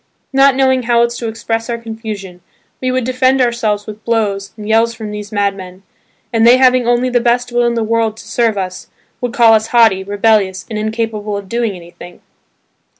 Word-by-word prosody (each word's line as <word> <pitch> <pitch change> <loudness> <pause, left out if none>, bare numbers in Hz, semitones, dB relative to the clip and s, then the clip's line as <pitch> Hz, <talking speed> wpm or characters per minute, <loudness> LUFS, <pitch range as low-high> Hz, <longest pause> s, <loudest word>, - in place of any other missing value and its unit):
Not 270 0 +5
knowing 260 -1 +2
how 235 -1 +2
else 235 0 -1
to 235 - -4
express 225 +1 -3
our 235 - -2
confusion 220 -5 -8 0.4
we 255 - -1
would 255 0 0
defend 255 +2 +1
ourselves 230 -4 0
with 215 0 -10
blows 205 -4 -1
and 210 -1 -8
yells 225 +1 +2
from 220 -2 -7
these 210 0 -7
madmen, 195 -2 -3 0.5
and 225 - +1
they 240 +2 +7
having 255 -2 +3
only 245 +1 +2
the 245 - +3
best 245 +1 0
will 240 0 +2
in 235 - -1
the 230 - 0
world 225 -1 0
to - - -12
serve 230 -3 0
us, 185 -1 -5 0.3
would 245 -1 -2
call 235 -2 +5
us 220 0 +2
haughty, 225 -5 +3
rebellious, 200 -1 +1
and 215 - -3
incapable 215 -1 -3
of 200 -1 -8
doing 230 0 -1
anything. 175 0 -13
225 Hz, 195 wpm, -15 LUFS, 205-240 Hz, 0.5 s, they